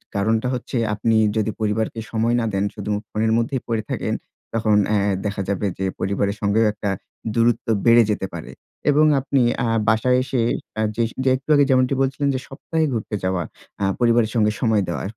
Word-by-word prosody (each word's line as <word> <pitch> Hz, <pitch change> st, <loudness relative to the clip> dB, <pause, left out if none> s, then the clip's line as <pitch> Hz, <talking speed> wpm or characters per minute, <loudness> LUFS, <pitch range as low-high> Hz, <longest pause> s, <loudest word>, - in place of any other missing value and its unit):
কারণটা 110 Hz, +4 st, +1 dB
হচ্ছে 125 Hz, 0 st, -3 dB, 0.2 s
আপনি 110 Hz, +2 st, +1 dB, 0.2 s
যদি 110 Hz, 0 st, 0 dB
পরিবারকে 110 Hz, +1 st, -1 dB
সময় 115 Hz, +1 st, +1 dB
না 115 Hz, -, 0 dB
দেন, 95 Hz, 0 st, +1 dB
শুধু 105 Hz, -, -4 dB, 0.2 s
ফোনের 110 Hz, +1 st, 0 dB
মধ্যেই 120 Hz, +2 st, -1 dB
পড়ে 115 Hz, -2 st, 0 dB
থাকেন -, -, -2 dB, 0.4 s
তখন 110 Hz, -2 st, +2 dB
অ্যা 105 Hz, -1 st, +2 dB, 0.3 s
দেখা 100 Hz, -1 st, -2 dB
যাবে 100 Hz, +1 st, -1 dB
যে 95 Hz, -, -2 dB
পরিবারের 100 Hz, +1 st, -1 dB
সঙ্গেও 105 Hz, +2 st, +2 dB
একটা 105 Hz, -, -3 dB, 0.4 s
দূরত্ব 115 Hz, 0 st, +1 dB, 0.2 s
বেড়ে 115 Hz, 0 st, +7 dB
যেতে 100 Hz, -, -2 dB
পারে 85 Hz, -, -7 dB, 0.4 s
এবং 150 Hz, +2 st, +5 dB
আপনি 135 Hz, 0 st, +1 dB, 0.2 s
আ -, -, 0 dB, 0.2 s
বাসায় 120 Hz, +3 st, +3 dB
এসে 130 Hz, -2 st, -1 dB, 0.8 s
যে 135 Hz, -, +3 dB
একটু 135 Hz, +3 st, -10 dB
আগে 145 Hz, -, +5 dB
যেমনটি 130 Hz, +1 st, +3 dB
বলছিলেন 135 Hz, +2 st, 0 dB
যে -, -, -1 dB
সপ্তাহে 160 Hz, +4 st, -2 dB
ঘুরতে 110 Hz, -2 st, -3 dB
যাওয়া 95 Hz, -2 st, 0 dB, 0.4 s
আ -, -, +3 dB
পরিবারের 115 Hz, -2 st, +3 dB
সঙ্গে 105 Hz, -1 st, +3 dB
সময় 110 Hz, -4 st, +2 dB
দেওয়া। 85 Hz, -4 st, -3 dB
115 Hz, 175 wpm, -22 LUFS, 105-125 Hz, 0.8 s, বেড়ে